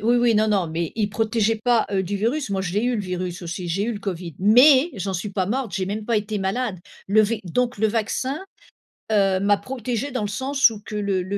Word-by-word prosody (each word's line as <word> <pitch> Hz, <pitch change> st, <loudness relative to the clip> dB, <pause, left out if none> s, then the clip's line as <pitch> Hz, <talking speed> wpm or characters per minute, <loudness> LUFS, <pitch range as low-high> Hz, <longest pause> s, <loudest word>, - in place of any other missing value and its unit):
oui, 240 Hz, +1 st, +4 dB
oui, 240 Hz, -1 st, +3 dB
non, 215 Hz, +1 st, +3 dB
non, 195 Hz, -5 st, +1 dB
mais 165 Hz, 0 st, -3 dB
il 210 Hz, -2 st, +1 dB
protégeait 225 Hz, +1 st, 0 dB
pas, 240 Hz, -2 st, +3 dB
heu, 195 Hz, -1 st, +1 dB
du 195 Hz, +2 st, -3 dB
virus, 235 Hz, +5 st, -1 dB
moi 195 Hz, -1 st, 0 dB
je 180 Hz, -2 st, -4 dB
l'ai 210 Hz, -, +1 dB
eu, 245 Hz, 0 st, +1 dB
le 215 Hz, -, -1 dB
virus, 180 Hz, -2 st, -4 dB
aussi, 175 Hz, +1 st, -5 dB
j'ai 190 Hz, +5 st, 0 dB
eu 235 Hz, -, -1 dB
le 210 Hz, -, -5 dB
covid 180 Hz, -5 st, -5 dB
mais 260 Hz, -, +6 dB
j'en 195 Hz, -1 st, -3 dB
suis 195 Hz, +4 st, -3 dB
pas 190 Hz, -2 st, -1 dB
morte, 240 Hz, 0 st, -2 dB
j'ai 185 Hz, -, -1 dB
même 210 Hz, +2 st, -4 dB
pas 230 Hz, 0 st, +1 dB
été 210 Hz, 0 st, -4 dB
malade. 195 Hz, +1 st, -2 dB, 0.3 s
Le 215 Hz, +3 st, +4 dB
v 220 Hz, +2 st, -1 dB
donc 245 Hz, +7 st, -1 dB
le 220 Hz, -, +3 dB
vaccin, 235 Hz, +6 st, -1 dB, 0.7 s
heu, 195 Hz, -3 st, +3 dB
m'a 200 Hz, +1 st, +3 dB
protégée 250 Hz, +4 st, -4 dB
dans 255 Hz, -, -2 dB
le -, -, -1 dB
sens 265 Hz, +5 st, +2 dB
où 220 Hz, -, -8 dB
que 210 Hz, -, -7 dB
le 200 Hz, -3 st, 0 dB
le 195 Hz, +3 st, -3 dB
210 Hz, 250 wpm, -23 LUFS, 190-235 Hz, 0.7 s, mais